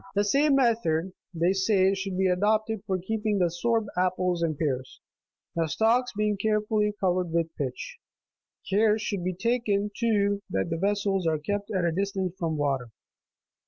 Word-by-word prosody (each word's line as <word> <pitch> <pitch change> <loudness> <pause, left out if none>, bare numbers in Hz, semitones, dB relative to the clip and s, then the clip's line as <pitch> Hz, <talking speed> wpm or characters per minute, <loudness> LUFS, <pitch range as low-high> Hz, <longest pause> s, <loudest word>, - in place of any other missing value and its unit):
The 205 - +3
same 280 +7 +3
method, 190 -9 +1 0.2
they 175 +1 +1
say, 195 0 +3
should 195 -1 -3
be 190 - +2
adopted 215 +3 +1
for 190 -2 0
keeping 210 +3 -1
sorb 210 +6 +1
apples 180 -1 0
and 160 -3 0
pears, 135 -4 -3 0.6
the 165 -1 +1
stalks 235 +8 +2
being 210 -1 +1
carefully 210 0 +1
covered 180 -2 +1
with 165 -1 -1
pitch; 130 -4 -5 0.7
care 210 +2 +3
should 205 -4 -3
be 185 0 -2
taken, 210 -1 0
too, 205 -3 +1
that 95 +6 -1
the 165 - 0
ves 200 +3 0
sels 195 -4 0
are 160 -1 +2
kept 205 +7 -3
at 190 -5 0
a 170 - +2
distance 190 0 -2
from 160 -2 -1
water. 135 -4 -1
195 Hz, 160 wpm, -27 LUFS, 170-215 Hz, 0.7 s, The